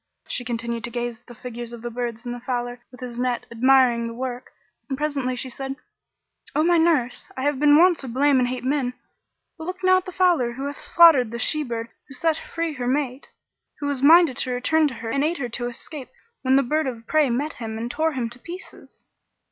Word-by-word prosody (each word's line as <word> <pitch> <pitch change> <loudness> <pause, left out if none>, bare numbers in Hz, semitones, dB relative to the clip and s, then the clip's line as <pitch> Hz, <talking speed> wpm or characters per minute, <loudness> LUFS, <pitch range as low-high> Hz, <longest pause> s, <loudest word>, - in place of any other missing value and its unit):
She 250 - -3
continued 235 -1 -3
to - - -4
gaze 240 -1 -4
at - - -39
the 240 - -11
figures 240 0 -7
of 235 -1 -9
the 240 - -4
birds 235 -1 -4
and 240 - -3
the 245 - -6
fowler 245 0 -3
with 250 - -15
his 245 -1 -6
net, 250 -1 -1
admiring 245 -1 +4
the 230 - -7
work, 250 0 -5 0.4
and 270 - -2
presently 280 -4 -1
she 250 - -3
said, 270 +2 -5 0.8
"O 305 - +3
my 340 0 +4
nurse, 300 -7 +1
I 260 - -3
have 290 -1 +1
been 295 0 +6
wont 350 +1 +5
to 270 - -6
blame 270 +3 +3
and 250 - +2
hate 250 0 -4
men, 260 -2 0 0.6
but 320 - -6
look 365 +1 -6
now 370 0 +6
at 370 - -14
the - - -5
fowler 345 -10 +2
how 265 +3 -6
he - - -2
hath - - -13
slaughtered 320 -9 +6
the 235 - -5
she 305 +5 +1
bird 230 -4 -4 0.2
who 275 - -10
set 320 +4 +1
free 330 -1 -4
her 250 -3 -4
mate; 265 0 -1 0.5
who 290 - -4
was 285 -2 -1
minded 320 -2 +6
to 255 - -1
return 300 +6 +2
to 265 - -6
her 225 0 -5
and 275 +4 +1
aid 330 +3 0
her 245 -3 -3
to 240 +1 -3
escape 260 +3 -8 0.3
when 260 0 +3
the 275 - +5
bird 305 +3 0
of 230 -3 -6
prey 305 -1 +3
met 285 +6 -1
him 220 -1 -4
and 235 +2 -4
tore 320 +2 0
him 250 -3 -2
to 240 - -11
pieces." 350 +7 -11
255 Hz, 235 wpm, -23 LUFS, 240-300 Hz, 0.8 s, been